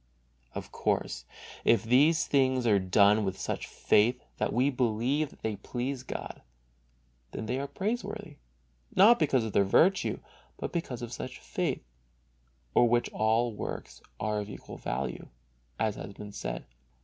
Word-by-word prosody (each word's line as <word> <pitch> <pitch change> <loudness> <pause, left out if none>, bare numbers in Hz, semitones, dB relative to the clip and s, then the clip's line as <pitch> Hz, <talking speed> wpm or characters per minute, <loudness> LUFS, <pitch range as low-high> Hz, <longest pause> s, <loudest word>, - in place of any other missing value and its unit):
Of - - -6
course, - - -1 0.4
if 115 - +4
these 145 +8 +4
things 130 -3 +2
are 105 -3 +5
done 100 +3 +4
with 95 -1 -2
such - - -3
faith 120 +4 +2 0.2
that - - 0
we 130 +4 +2
believe 125 +4 +1
that - - -19
they 110 -2 -1
please 125 +5 -3
God, 130 - -6 0.9
then 110 - -4
they 125 +4 -1
are 140 - -3
praiseworthy, 205 -4 -4 0.6
not 220 +5 +7
because 135 -6 +3
of 110 -2 -4
their 100 - +5
virtue, 175 - +3 0.4
but - - -5
because 130 -8 -3
of 120 0 -6
such 130 - -6
faith, - - -2 0.9
for 120 - +5
which 120 0 +2
all 115 +2 +2
works - - -6 0.2
are 105 0 0
of 105 0 -5
equal - - -9
value, 65 +3 -3 0.5
as 110 -2 0
has 100 - -7
been 105 +1 -9
said. - - -5
120 Hz, 150 wpm, -30 LUFS, 105-140 Hz, 0.9 s, not